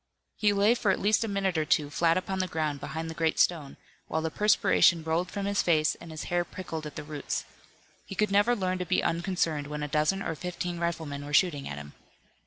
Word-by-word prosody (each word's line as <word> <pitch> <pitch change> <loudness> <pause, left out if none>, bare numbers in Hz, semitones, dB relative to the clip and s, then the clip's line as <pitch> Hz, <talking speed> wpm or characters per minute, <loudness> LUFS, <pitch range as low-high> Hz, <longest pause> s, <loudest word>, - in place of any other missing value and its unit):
He 210 -1 +3
lay 205 +3 +4
for 235 -4 0
at 190 - +2
least 210 +3 +3
a - - -2
minute 195 -4 0
or - - +2
two 150 -1 +1
flat 165 +2 +2
upon 190 +1 -2
the 185 - 0
ground 155 -4 -2
behind 160 +4 -5
the 160 - -5
great 160 -1 0
stone, 155 -6 +1 0.3
while 160 0 -1
the 160 - -2
perspiration 180 -4 +4
rolled 165 +3 0
from 200 +1 -4
his 200 0 +1
face 155 -2 +3
and 170 - -12
his 155 -1 -6
hair 175 0 0
prickled 165 -4 -6
at 150 - -10
the - - -5
roots. 150 -1 -4 0.6
He 195 - -7
could 210 +1 +1
never 205 +5 +4
learn 185 -3 -1
to 180 - -2
be 185 - +2
unconcerned 165 -4 -1
when 150 0 -4
a - - -2
dozen 155 +7 +1
or - - -2
fifteen 175 +1 -4
riflemen 160 -4 -3
were 145 0 -2
shooting 150 -6 +2
at 70 - -5
him. 75 0 -9
170 Hz, 230 wpm, -28 LUFS, 155-190 Hz, 0.6 s, lay